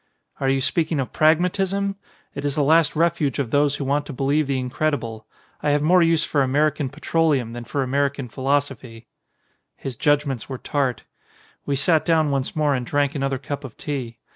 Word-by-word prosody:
"Are 135 - +1
you 135 0 +1
speaking 160 +2 0
of 130 - -3
Pragmatism? 190 +5 +2 0.4
It 140 - -6
is 145 -1 -1
the 150 - +2
last 160 +2 +4
refuge 165 -4 +1
of 130 -5 -2
those 145 0 +3
who 145 - -4
want 145 +2 0
to - - -6
believe 140 +3 +1
the 135 -1 0
ini 125 -1 -4
credible. 115 -8 -2 0.3
I 150 - 0
have 145 0 +2
more 180 +3 +5
use 165 -1 +3
for 145 - +1
American 145 +1 +1
petroleum 150 -4 0
than 120 0 -7
for 140 +2 -1
American 140 0 -1
philosophy." 130 -3 -2 0.7
His 135 -2 -6
judgments 145 -3 0
were 130 - -4
tart. 135 -2 -1 0.6
We 140 - +1
sat 155 +3 +3
down 160 -3 +2
once 135 -2 -2
more 150 -2 +2
and 130 -2 -1
drank 145 +2 0
another 135 -2 -1
cup 140 +2 -6
of 130 -5 -10
tea. 130 -6 -5
145 Hz, 190 wpm, -22 LUFS, 135-155 Hz, 0.7 s, more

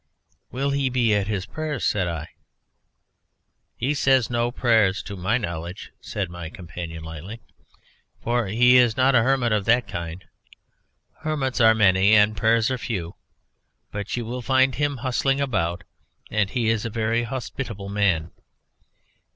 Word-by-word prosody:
"Will 140 +2 -2
he 140 -1 0
be 120 -4 +2
at 100 -1 +1
his 100 -3 -2
prayers?" 155 +1 -4
said 95 -4 +1
I. 80 -3 -5 1.5
"He 135 +5 -1
says 135 -4 +2
no 120 0 +1
prayers 110 -6 +2
to 100 - -7
my 95 +6 0
knowledge," 85 -4 -6
said 100 -3 -3
my 85 -2 -7
companion 80 -1 -8
lightly; 80 +8 -8 0.8
"for 120 -2 -1
he 125 +5 +5
is 120 -3 +4
not 130 +1 +4
a 120 - +5
hermit 125 -1 +1
of 105 -2 +1
that 120 +1 +3
kind. 85 +1 -6 0.9
Hermits 145 -5 -1
are 110 -1 +6
many 100 0 +4
and 105 +1 +4
prayers 115 +4 +2
are 130 - -2
few. 95 -8 -4 0.8
But 105 +3 -4
you 120 - -3
will 125 +2 -5
find 130 +1 +3
him 145 +1 -1
bustling 135 +1 +1
about, 95 -11 -1 0.5
and 105 -2 +1
he 115 -2 0
is 115 -2 0
a 115 - -3
very 115 +1 0
hospitable 120 -4 -5
man. 95 -6 0
110 Hz, 150 wpm, -24 LUFS, 95-125 Hz, 1.5 s, are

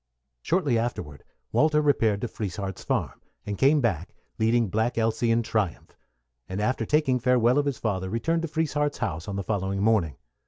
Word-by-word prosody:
Shortly 145 - +1
afterward 75 -11 -4 0.3
Walter 150 0 +3
repaired 115 -9 +2
to 120 - -1
Frieshardt's 95 -3 -5
farm, - - -2 0.2
and 105 - -3
came 140 +6 +4
back 95 -8 -1 0.2
leading 115 +1 +3
Black 110 +5 0
Elsy 115 +1 +1
in 115 +1 +3
triumph; 110 -5 -2 0.5
and 95 +2 -3
after 115 +1 0
taking 150 -4 +2
farewell 125 +1 +3
of 145 - 0
his 140 - -1
father, 95 -4 -2
returned 165 - 0
to 165 - -2
Frieshardt's 150 -2 -1
house 90 -7 -3
on 100 - -4
the 100 - -2
following 95 -1 -2
morning. 100 - +2
115 Hz, 170 wpm, -26 LUFS, 100-135 Hz, 0.5 s, came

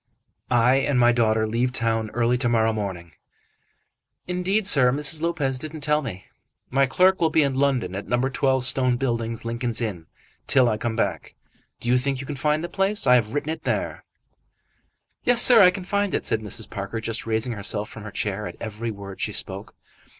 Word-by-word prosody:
"I 120 +2 +3
and 135 -1 0
my 120 0 +5
daughter 110 -2 +1
leave 120 +3 -1
town 115 -3 -1
early 120 0 +2
to 120 -2 +1
morrow 115 -1 +2
morning." 95 -5 -5 1.1
"Indeed, 185 +4 -1
sir. 135 -9 +5
Mrs. 150 +3 +1
Lopez 140 -6 -1
didn't 155 +2 -7
tell 150 +1 +2
me." 95 -9 -7 0.5
"My 135 +1 +3
clerk 185 +7 +3
will 165 - +3
be 155 -1 +3
in 140 -1 0
London, 130 -9 0
at 100 - -6
No. 120 - +1
12, 130 -1 +1
Stone 130 0 +4
Buildings, 115 -3 -3
Lincoln's 120 0 -1
Inn, 95 -9 -4 0.4
till 130 -2 +4
I 110 -2 0
come 115 0 -3
back. 115 - -3 0.4
Do - - -7
you 125 +1 +3
think 135 +1 -2
you 135 - -6
can 145 - -5
find 150 +3 0
the - - -3
place? 195 +1 0
I 125 - +5
have 120 0 +1
written 145 +2 -2
it 160 - -6
there." - - -3 1.2
"Yes, 245 -1 +3
sir, 245 -1 +8
I 180 - +8
can 185 0 -5
find 200 +1 -1
it," - - -3
said 110 -2 0
Mrs. 105 0 -6
Parker, 100 +3 -5
just 115 +1 -3
raising 115 +2 -1
herself 105 0 -2
from 110 - -11
her 105 - -8
chair 105 0 -3
at - - -9
every 110 +1 -5
word 100 -2 -8
she - - -1
spoke. - - -5
125 Hz, 200 wpm, -23 LUFS, 110-145 Hz, 1.2 s, sir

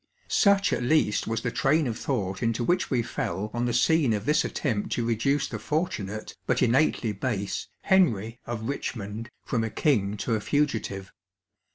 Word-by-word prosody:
Such 200 -1 +4
at - - 0
least 120 -5 +2
was 115 0 -1
the 125 - -2
train 150 +5 +2
of 115 -3 -2
thought 100 -7 -2
into 115 0 0
which 180 +8 +1
we 125 -3 +1
fell 100 0 -3
on 120 +1 -1
the 120 - 0
scene 135 +1 +3
of 105 0 -2
this 150 +1 +3
attempt 110 -8 -2
to 120 - -1
reduce 135 +5 +1
the 105 - -5
fortunate, 110 - -3
but - - +2
innately 125 -2 +2
base, 100 -3 -3
Henry 120 - +2
of 120 -2 -3
Eichmond 115 -4 -4 0.2
from 115 -2 0
a 110 - -1
king 105 -7 +1
to 115 - -1
a 110 - +1
fugitive. 110 -9 -1
115 Hz, 175 wpm, -27 LUFS, 105-140 Hz, 0.2 s, Such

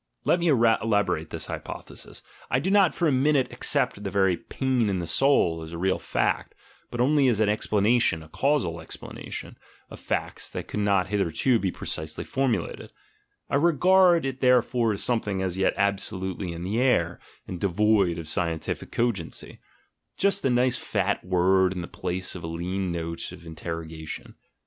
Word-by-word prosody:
Let 175 - +3
me 170 - 0
elaborate 110 - +2
this - - -4
hypothesis: - - -8 0.3
I 125 - +2
do 185 +8 -1
not 195 -4 +4
for 170 - +1
a - - +3
minute 135 -1 +2
accept 125 -4 0
the 100 - -2
very 95 -2 +2
"pain 125 +4 -1
in 95 - 0
the 85 - -3
soul" 85 - +2
as 80 +1 -8
a - - -4
real 95 +2 +1
fact, - - -1 0.3
but 120 - -6
only 140 +2 +4
as 115 -4 +2
an 110 -1 +3
explana 105 +2 +2
tion 80 -6 +1
(a - - -14
casual 125 - 0
explanation) - - -8 0.3
of - - -9
facts - - -3
that - - -6
could - - -4
not 100 -2 +2
hith 105 0 0
erto 105 +7 +2
be 95 -2 0
precisely 80 -2 -4
formulated; 125 -9 -2 0.6
I - - +1
regard 175 +2 +4
it 135 -1 -4
therefore 125 -2 +3
as 100 - -3
something 105 -5 0
as 95 0 -2
yet 95 - +2
absolutely 95 -2 -1
in 85 +1 -6
the 105 +6 0
air 90 -10 +2 0.3
and 90 - -5
devoid 100 -2 +2
of 85 - -6
scien 85 0 0
tific - - -5
cogency 115 -9 -2 0.3
— - - -52
just 200 0 +1
a 135 - +2
nice 125 0 +2
fat 100 -1 -1
word 95 +1 +3
in 90 - -4
the 85 - -6
place 90 0 -4
of 90 - -8
a - - -4
lean 90 +3 -3
note 85 0 -4
of 85 - -12
interrogation. 80 -1 -6
100 Hz, 180 wpm, -26 LUFS, 90-125 Hz, 0.6 s, not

